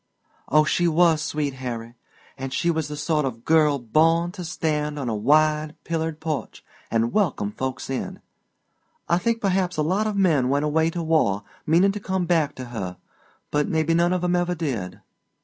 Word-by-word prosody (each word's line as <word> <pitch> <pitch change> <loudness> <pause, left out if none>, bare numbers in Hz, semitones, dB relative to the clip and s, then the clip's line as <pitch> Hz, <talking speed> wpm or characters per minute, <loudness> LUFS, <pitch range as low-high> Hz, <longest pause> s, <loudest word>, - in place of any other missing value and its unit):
"Oh, 155 +2 +5
she 175 +2 +2
was 165 -1 +4
sweet, 150 -3 -2
Harry! 120 -3 -6 0.4
And 135 -1 -5
she 170 +6 +1
was 160 -3 -2
the 150 0 -6
sort 150 0 0
of 120 -4 -5
girl 155 -3 +4
born 165 +7 +2
to 180 - -7
stand 150 -3 -2
on 135 -4 -3
a 110 - -1
wide, 150 +6 +2
pillared 160 -1 -2
porch 155 -2 -4 0.2
and 115 +1 0
welcome 145 - +1
folks 130 +3 -4
in. 135 -1 -4 0.9
I 170 +2 +2
think 230 +4 0
perhaps 185 -3 0
a 155 - +2
lot 190 +7 +1
of 210 -2 -2
men 155 -10 +3
went 140 +2 +1
away 160 +2 +2
to 170 0 -4
war 155 -12 +2 0.2
meanin' 175 +5 +4
to 210 - -5
come 190 -2 -1
back 165 -4 +1
to 130 - -7
her; 90 -5 -4 0.5
but 150 0 +1
maybe 160 0 +1
none 170 +1 +3
of 180 -1 0
'em 180 0 +2
ever 175 0 0
did." 120 - -4
155 Hz, 185 wpm, -24 LUFS, 135-170 Hz, 0.9 s, Oh